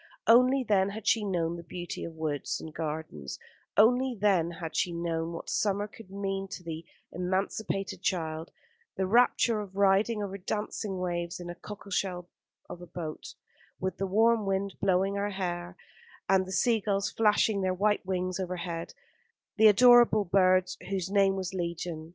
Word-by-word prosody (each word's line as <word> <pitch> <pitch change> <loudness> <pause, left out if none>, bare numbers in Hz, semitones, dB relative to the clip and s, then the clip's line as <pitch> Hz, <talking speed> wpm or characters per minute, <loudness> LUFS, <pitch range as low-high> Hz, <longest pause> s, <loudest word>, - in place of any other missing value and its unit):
Only 255 +3 +5
then 195 -2 +3
had 215 +1 -7
she 225 -2 +3
known 170 -4 -1
the 170 - -9
beauty 175 +1 -6
of 165 - -8
woods 155 -3 -2
and 160 - -9
gardens; 150 - -5 0.4
only 245 +3 +4
then 190 -5 +3
had 165 -1 -7
she 180 - +1
known 170 -1 -2
what 165 - -7
summer 205 0 0
could 210 -1 -14
mean 195 0 -3
to 180 - -7
the 165 -1 -6 0.3
emancipated 190 +1 -2
child: 160 -4 -2 0.5
the 190 - 0
rapture 235 +1 +3
of 195 -2 -10
riding 200 +2 +3
over 200 0 -5
dancing 210 0 -3
waves 175 -1 -3
in 175 0 -6
a - - -6
cockle 200 +2 -10
shell 180 -2 -2 0.4
of 175 - -9
a 175 - -10
boat, 160 -3 -7 0.4
with 185 +1 -3
the 195 - -1
warm 220 +2 +3
wind 195 0 -1
blowing 195 0 +2
her 200 +1 -1
hair 175 -2 -4 0.5
and 190 -1 +3
the - - -7
sea 230 +3 +2
gulls 200 0 -1
flashing 210 -1 +2
their 185 -1 0
white 205 +2 +1
wings 185 -1 -2
overhead, 175 -2 -4 0.6
the 220 0 +7
adorable 240 -1 +6
birds 185 0 +3
whose 190 -1 -2
name 195 -1 +3
was 190 0 -4
legion. 170 -2 -4
190 Hz, 165 wpm, -29 LUFS, 175-205 Hz, 0.6 s, the